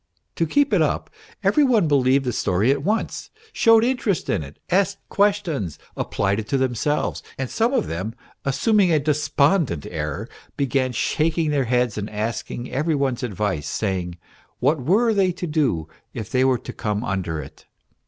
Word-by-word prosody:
To 165 - +1
keep 285 - +2
it - - +4
up, - - 0 0.3
every 300 - +4
one 230 - +3
believed 135 -1 +3
the 125 - -1
story 100 +5 +2
at 140 0 0
once, 215 +6 -1 0.2
showed 225 -1 +5
interest 240 -7 0
in - - 0
it, 70 0 -10
asked 195 +2 +2
questions, 195 - 0 0.2
applied 100 +1 0
it 110 - -5
to 135 - +1
themselves; 130 +3 0 0.2
and 130 -2 -3
some 230 +2 +1
of 275 - +1
them, 95 +8 -4 0.3
assuming 195 - +3
a 160 - +4
despondent 150 - +1
air, 75 -3 -4 0.3
began 130 -1 +1
shaking 155 +5 0
their 140 -3 +1
heads 125 -3 +1
and 105 +1 -4
asking 110 +3 -4
every 150 +5 0
one's 135 -3 0
advice, 105 - -2
saying 90 -4 -2 0.4
what 140 +3 +1
were 220 - +3
they 195 -3 +3
to 180 - -5
do 140 - 0 0.3
if 110 -4 -6
they 130 0 +3
were 130 -1 +3
to - - -8
come 105 0 -2
under 90 -7 -2
it 70 -2 -11
135 Hz, 170 wpm, -23 LUFS, 105-170 Hz, 0.4 s, showed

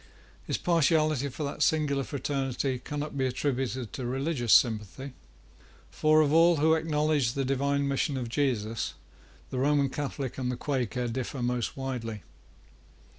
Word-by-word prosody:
His - - 0
partiality 155 -4 +2
for 140 +4 -6
that 140 - -4
singular 145 -3 +2
fraternity 135 -2 -2
cannot 145 +3 -5
be 135 -1 +1
attributed 130 -2 -2
to 130 - -4
religious 135 -2 -1
sympathy; 120 +3 +2 0.8
for, 155 0 +4
of 150 -1 +2
all 165 +1 +6
who 160 +1 +3
acknowledge 150 -5 +1
the 135 -1 -1
divine 140 +1 0
mission 140 0 0
of 125 -2 -3
Jesus, 115 -4 -1 0.6
the 130 - -2
Roman 140 0 +2
Catholic 140 -2 -4
and 125 -1 -1
the 125 - -4
Quaker 125 -3 -2
differ 125 +2 -3
most 125 +1 -1
widely. 115 -7 -4
135 Hz, 140 wpm, -28 LUFS, 125-150 Hz, 0.8 s, all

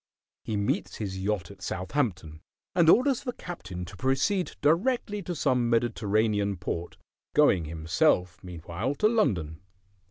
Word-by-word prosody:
He 110 - -2
meets 100 0 -1
his 95 -3 -4
yacht 100 -3 -2
at 100 -1 -15
Southampton, 90 - -2 0.3
and 170 -3 +4
orders 255 +5 +4
the 250 -3 -4
captain 95 - -7
to 100 +3 -11
proceed 135 - 0
directly 205 - +1
to 175 -1 -4
some 125 -5 +1
Mediterranean 110 -3 +1
port, 85 -1 -5 0.4
going 105 - +4
himself, 85 +3 +1
meanwhile, 90 - -4
to 210 - +3
London. 90 - 0
105 Hz, 130 wpm, -28 LUFS, -, 0.4 s, and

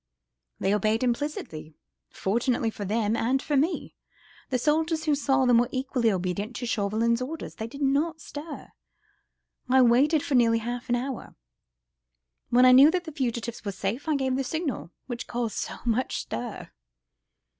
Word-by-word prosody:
They 195 - +1
obeyed 215 +3 +1
implicitly, 240 - -3 0.3
fortunately 230 +3 0
for 205 - -6
them 215 +2 0
and 250 +4 +1
for 290 +2 -2
me. 305 +6 0 0.6
The 255 - +1
soldiers 315 +4 +1
who 305 -2 +2
saw 270 -2 +2
them 245 -2 +5
were 240 +1 +1
equally 255 -3 0
obedient 190 +5 -2
to 245 - -4
Chauvelin's 230 +1 +1
orders. 305 +5 -5
They 220 - -5
did 280 +4 -6
not 300 +4 +1
stir! 300 0 -8 1.0
I 260 0 +6
waited 275 +6 +4
for 285 - -3
nearly 230 -2 +4
half 240 +2 -5
an 240 - +3
hour; 255 +1 -5 1.1
when 250 +1 +5
I 255 - +8
knew 270 +4 +9
that 360 +1 0
the 320 - -7
fugitives 235 -4 -3
were 200 - -3
safe 200 - -3
I 310 - +2
gave 265 -2 0
the 270 - 0
signal, 300 - -3 0.2
which 245 -1 -6
caused 235 -2 -3
so - - -4
much 240 +2 0
stir." 240 -3 -6
250 Hz, 165 wpm, -27 LUFS, 230-280 Hz, 1.1 s, knew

